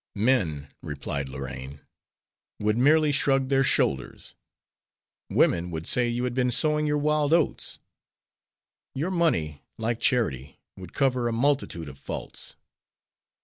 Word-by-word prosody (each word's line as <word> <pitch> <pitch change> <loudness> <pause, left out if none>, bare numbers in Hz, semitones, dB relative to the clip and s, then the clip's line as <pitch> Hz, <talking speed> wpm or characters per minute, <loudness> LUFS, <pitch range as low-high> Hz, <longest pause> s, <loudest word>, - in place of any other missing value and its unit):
"Men," 100 - +1
replied 70 -1 -4
Lorraine, 65 +1 -7 0.8
"would 105 0 +1
merely 150 +5 +4
shrug 135 -1 +1
their 135 -1 +3
shoulders; 65 - -1 1.0
women 85 +1 +2
would 80 -1 -5
say 125 -1 +2
you 120 +1 -2
had 125 -1 -1
been 125 0 +1
sowing 150 +4 +3
your 150 0 +1
wild 150 0 +1
oats. 170 -2 0 1.2
Your 160 +8 -2
money, 80 - 0 0.2
like 115 +1 -2
charity, 70 - 0 0.2
would 90 -2 -11
cover 130 -3 +1
a - - -1
multitude 115 - 0
of 70 -1 -11
faults." - - -7
120 Hz, 125 wpm, -26 LUFS, -, 1.2 s, merely